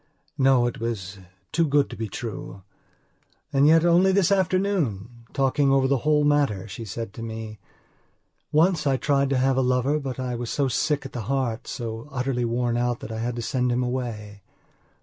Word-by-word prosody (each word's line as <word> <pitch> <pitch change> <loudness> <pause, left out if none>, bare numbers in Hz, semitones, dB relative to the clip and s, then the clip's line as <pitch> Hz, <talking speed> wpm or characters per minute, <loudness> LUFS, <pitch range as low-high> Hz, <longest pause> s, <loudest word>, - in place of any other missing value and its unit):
No, 130 -2 +4
it 120 - -3
was 105 -4 -4 0.3
too 165 0 +2
good 145 0 +3
to - - -6
be 110 - -4
true. 100 -3 -7 0.9
And 140 +1 +5
yet, 165 +1 +5
only 175 +3 +5
this 195 -1 +3
afternoon, 170 - 0
talking 135 0 +2
over 135 -1 +3
the 135 -1 +2
whole 150 +2 +2
matter 140 -9 +1
she 110 +3 -7
said 110 0 -6
to 115 - -9
me: 110 -1 -6 0.9
"Once 160 0 +3
I 135 -1 +2
tried 140 0 +1
to 135 - +1
have 130 0 +2
a - - +3
lover 130 +4 +1
but 135 -3 -5
I 125 -1 -2
was 120 -1 -4
so 140 -2 0
sick 140 +3 0
at 135 - -8
the 120 - -4
heart, 130 -3 -1
so 115 +1 -5
utterly 125 -2 -1
worn 120 0 0
out 120 0 0
that - - -7
I 110 - -4
had 120 +1 -2
to 120 - -4
send 125 +1 0
him 125 +1 +1
away." 115 -5 -4
125 Hz, 190 wpm, -24 LUFS, 115-145 Hz, 0.9 s, And